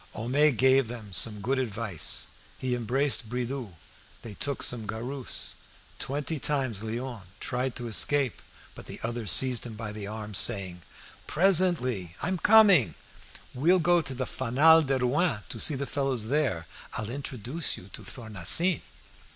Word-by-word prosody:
Homais 135 +7 +2
gave 130 +1 +3
them 110 -4 -9
some 105 +3 +1
good 130 +6 0
advice. 110 - -1 0.3
He 130 -1 -2
embraced 125 0 0
Bridoux; 125 -4 -4 0.5
they 115 - -8
took 140 +6 -2
some 115 -3 -1
garus. 125 +4 -4 0.5
Twenty 145 +3 -2
times 130 -8 0
Léon 120 +1 -5 0.2
tried 125 0 -2
to 120 - -5
escape, 135 +3 +2 0.3
but - - -12
the - - -8
other 115 -1 -3
seized 130 +3 +2
him 115 -3 -7
by 110 -1 -6
the 105 -1 -6
arm 105 0 -6
saying 95 -4 0 0.5
"Presently! 155 - +2
I'm 185 +3 -2
coming! 200 - +6 0.6
We'll 165 +9 +3
go 175 0 +3
to 135 -4 -4
the 130 +1 -2
'Fanal 145 +8 +4
de 135 0 +1
Rouen' 130 - +1
to 115 - -5
see 150 - +4
the 140 +1 -3
fellows 135 -6 -1
there. 130 - 0 0.3
I'll 110 +1 -4
introduce 135 +3 -2
you 95 +2 -13
to - - -7
Thornassin." 120 - +1
125 Hz, 150 wpm, -28 LUFS, 110-140 Hz, 0.6 s, coming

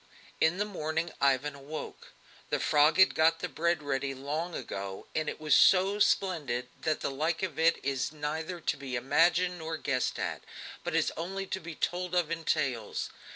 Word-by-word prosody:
In 160 +3 +3
the 205 - 0
morning 160 -4 -2
Ivan 140 +1 +2
awoke. 140 +3 -8 0.4
The - - 0
frog 150 +1 +4
had 190 0 +6
got 165 +1 +4
the - - -3
bread 170 -1 0
ready 135 -1 -1
long 155 +6 -3
ago, 95 -1 -5
and 155 -1 0
it - - -6
was 155 -1 +1
so 195 +2 +5
splendid 145 -13 +1
that 155 -1 0
the - - -1
like 160 +5 -1
of 170 -6 -3
it 165 +1 +4
is 135 -2 -1
neither 155 +3 -4
to - - -1
be 135 -2 -5
imagined 175 +7 +2
nor 160 0 -4
guessed 130 -4 -1
at, - - -3 0.4
but - - -2
is - - +2
only 190 +4 -4
to 190 - -3
be 165 -2 -8
told 180 +2 -2
of 170 -3 +1
in 165 0 -3
tales. 125 -9 -1
160 Hz, 185 wpm, -30 LUFS, 140-175 Hz, 0.4 s, had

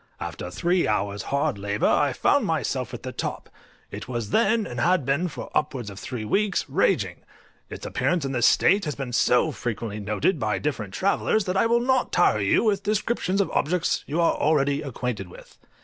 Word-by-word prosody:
After 90 - -5
three 175 - +1
hours' 100 -1 -1
hard 140 -5 0
labour 100 +1 -1
I 145 -2 +3
found 285 - +2
myself 130 -6 -1
at 120 - -8
the 130 - -5
top; - - -5 0.4
it - - -7
was 120 -4 -4
then, 220 0 +2
and 120 -8 -6
had 175 -1 +2
been 140 +7 +1
for 165 - -8
upwards 130 -8 -1
of 100 - -10
three 115 -1 -5
weeks, 200 - 0
raging: - - +1 0.5
its - - -8
appearance 180 - 0
in 135 - -2
this 120 -3 +3
state 200 -1 +4
has 150 - -3
been 135 -3 -5
so 125 +6 +3
frequently 115 -4 -4
noticed 105 - 0
by 110 -2 0
different 110 -10 -3
travellers, 200 +2 +1
that 185 -1 -2
I 210 - +3
will 235 +1 +3
not 260 0 +1
tire 175 -11 +3
you 100 - +2
with 205 -3 +1
descriptions 205 -1 -1
of 200 - -2
objects 165 +3 0
you 155 +4 -2
are 170 - +3
already 145 -1 +1
acquainted 125 - -4
with. - - -15
140 Hz, 195 wpm, -25 LUFS, 115-185 Hz, 0.5 s, state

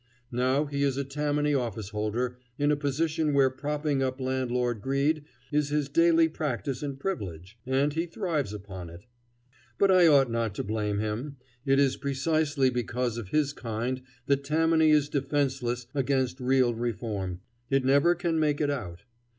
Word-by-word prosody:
Now 130 +4 +1
he 140 -1 -3
is 140 -2 +1
a 140 - 0
Tammany 145 +1 0
officeholder 115 0 -2 0.2
in 145 +1 +2
a - - +3
position 150 +1 0
where 135 -2 +4
propping 145 +1 -1
up 130 0 -1
landlord 125 -3 -1
greed 140 +4 0 0.3
is 150 -1 +1
his 145 -1 0
daily 165 +2 +4
practice 140 -4 -3
and 140 -2 -4
privilege, 100 - -5
and 135 +3 +1
he 165 +2 -1
thrives 165 - -2
upon 95 -4 -8
it. 85 +4 -13 0.7
But 200 -1 +4
I 180 -2 +6
ought 135 -5 +5
not 115 -3 -1
to - - -2
blame 105 -1 -1
him. 110 +7 -3 0.3
It 135 0 +4
is 140 -1 +3
precisely 140 0 +1
because 120 -1 -2
of 110 - -7
his 145 +5 +1
kind 120 +1 -3 0.2
that 140 0 +1
Tammany 160 +2 +3
is 150 -2 +4
defenceless 135 -4 -1
against 130 -2 0
real 130 -1 +3
reform. 105 -6 -3 0.3
It 135 -1 +2
never 140 +6 +4
can 170 -2 0
make 150 -2 +1
it 145 -1 +1
out. 100 -9 -5
135 Hz, 160 wpm, -28 LUFS, 120-150 Hz, 0.7 s, I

